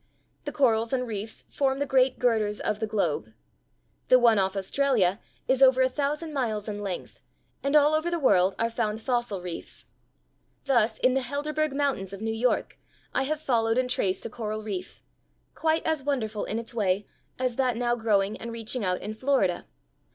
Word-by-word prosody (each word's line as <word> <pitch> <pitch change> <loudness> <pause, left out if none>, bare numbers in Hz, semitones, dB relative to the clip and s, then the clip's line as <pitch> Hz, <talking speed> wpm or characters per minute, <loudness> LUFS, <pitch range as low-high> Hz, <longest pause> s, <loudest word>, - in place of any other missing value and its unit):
The 290 - -3
corals 230 -5 +2
and 250 -1 +1
reefs 220 -1 -5
form 270 -1 +1
the 285 - 0
great 265 -1 +3
girders 220 -4 +1
of 210 - -2
the 220 - -1
globe. 210 -1 -1 0.7
The 255 - +7
one 235 -4 +5
off 190 0 0
Australia 205 -2 +1 0.3
is 260 0 +2
over 260 -1 +6
a 260 - +3
thousand 300 +4 -2
miles 225 -7 -1
in 205 -1 -4
length, 195 -3 -5 0.4
and 280 +2 0
all 300 0 +6
over 315 +2 +1
the 345 - -1
world 195 - +3
are 230 0 0
found 220 -2 -1
fossil 240 -6 -2
reefs. 175 -2 -7 0.8
Thus 235 -5 +2
in 255 - +3
the 265 - +1
Helderberg 295 +3 -2
Mountains 275 -10 -1
of 195 - -8
New 225 0 -1
York 240 +3 0 0.3
I 270 - +1
have 305 +2 -2
followed 225 -2 +1
and 255 0 +1
traced 195 -7 0
a - - -3
coral 215 -2 -4
reef, 195 -3 -6 0.5
quite 320 0 0
as 320 -3 0
wonderful 235 -7 -2
in 215 - -3
its 230 +1 -5
way 200 -3 0 0.3
as 255 -2 -1
that 255 -3 +1
now 240 0 +1
growing 210 -3 +1
and 235 +1 -7
reaching 230 +1 -3
out 180 -1 0
in 210 - -5
Florida. 220 -7 0
235 Hz, 185 wpm, -27 LUFS, 210-270 Hz, 0.8 s, The